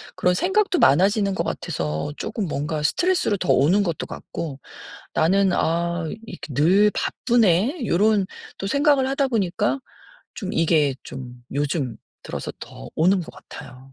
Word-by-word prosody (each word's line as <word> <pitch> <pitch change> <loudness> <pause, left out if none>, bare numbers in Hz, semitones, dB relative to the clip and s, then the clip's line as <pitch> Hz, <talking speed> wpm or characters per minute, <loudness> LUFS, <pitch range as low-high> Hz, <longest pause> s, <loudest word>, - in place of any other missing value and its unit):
그런 180 - +2
생각도 380 - +1
많아지는 195 +6 +4
것 - - -1
같아서 80 - -3
쪼끔 220 -2 -3
뭔가 150 +1 -2
스트레스로 350 - +1
더 180 - -4
오는 170 +10 +4
것도 170 -5 -2
같고 145 -5 -6 0.5
'나는 190 +4 +3
아 170 0 0 0.2
이렇게 175 - -8
늘 190 +9 +4
바쁘네.' 235 - +1
요런 205 +2 +3 0.3
또 195 - -4
생각을 280 +2 +3
하다 275 0 +1
보니까 210 +3 0 0.6
좀 200 0 -5
이게 155 -6 +2
좀 125 -2 -9
요즘 140 -4 -1 0.3
들어서 - - -5
더 - - -10
오는 185 +4 +3
것 165 - -9 0.2
같아요. 135 -3 -10
180 Hz, 285 characters per minute, -23 LUFS, 150-215 Hz, 0.6 s, 많아지는